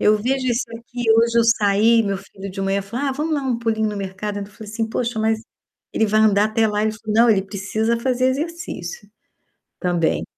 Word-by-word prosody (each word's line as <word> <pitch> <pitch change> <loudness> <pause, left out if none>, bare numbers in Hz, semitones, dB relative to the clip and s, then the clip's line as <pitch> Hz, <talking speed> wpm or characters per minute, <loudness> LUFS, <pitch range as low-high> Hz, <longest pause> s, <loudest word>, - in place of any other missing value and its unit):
Eu 210 +1 +4
vejo 255 +4 -1
isso 240 0 +1 0.2
aqui, 245 +1 -7
hoje 230 +1 +4
eu - - +6
saí, 225 +1 +4
meu 200 -1 -1
filho 195 0 -10
de 195 +1 -6
manhã 195 +1 0
falou: 230 +8 -4
"Ah 270 - 0
vamos 305 +4 -1
dar 285 - -1
um 255 -3 -1
pulinho 220 -2 0
no 210 - -4
mercado". 200 +1 -4
Eu - - -2
ainda 200 0 -7
falei 210 +1 -11
assim: 225 0 -2
"Poxa 235 0 -2
mas, 220 0 +1 0.5
ele 220 - +2
vai 215 +1 +2
andar 205 -1 +4
até 220 +1 +2
lá?". 210 0 0
Ele 220 0 +1
falou: 215 -1 -5
"Não, 230 +2 +5
ele 200 -3 +3
precisa 215 +4 -1
fazer 255 +1 +1
exercício, 335 - -4 0.7
também". 175 -3 0
220 Hz, 220 wpm, -21 LUFS, 205-235 Hz, 0.7 s, eu